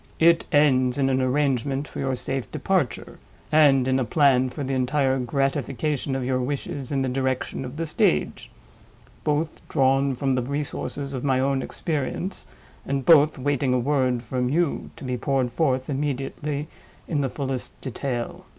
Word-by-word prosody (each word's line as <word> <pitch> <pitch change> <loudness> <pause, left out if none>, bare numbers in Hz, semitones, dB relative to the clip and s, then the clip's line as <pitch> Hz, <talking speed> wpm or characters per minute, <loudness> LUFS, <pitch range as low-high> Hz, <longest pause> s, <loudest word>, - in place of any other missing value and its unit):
"It 165 +1 +5
ends 130 -4 +3
in 135 -1 +2
an 130 0 +2
arrangement 135 +1 0
for - - -8
your 135 -1 0
safe 135 +1 -4
departure, 155 - -1 0.3
and 140 -4 +5
in 130 0 +2
a - - +1
plan 130 0 +3
for 145 +3 -5
the 135 0 -2
entire 130 +1 +1
gratification 135 +2 -1
of 130 -2 -2
your 130 0 0
wishes 135 0 -4
in 135 -2 +1
the - - 0
direction 130 0 -2
of 130 +3 -7
the 165 - -1
stage. 75 - 0 0.7
Both 155 +1 -1
drawn 135 0 +2
from 135 +1 0
the 130 - +1
resources 140 +1 -4
of 130 - -4
my 135 -2 +2
own 135 0 +1
experience, 160 +6 -3 0.4
and 135 -1 -2
both 155 -2 +6
waiting 135 -1 +1
a - - +3
word 130 -2 +1
from 125 +1 -1
you, 165 +2 0
to - - -11
be 125 -1 -2
poured 130 0 0
forth 130 -1 0
immediately 145 +1 -3 0.4
in 150 -4 0
the 135 - 0
fullest 135 -1 -4
detail." 125 -2 -4
135 Hz, 165 wpm, -24 LUFS, 130-145 Hz, 0.7 s, both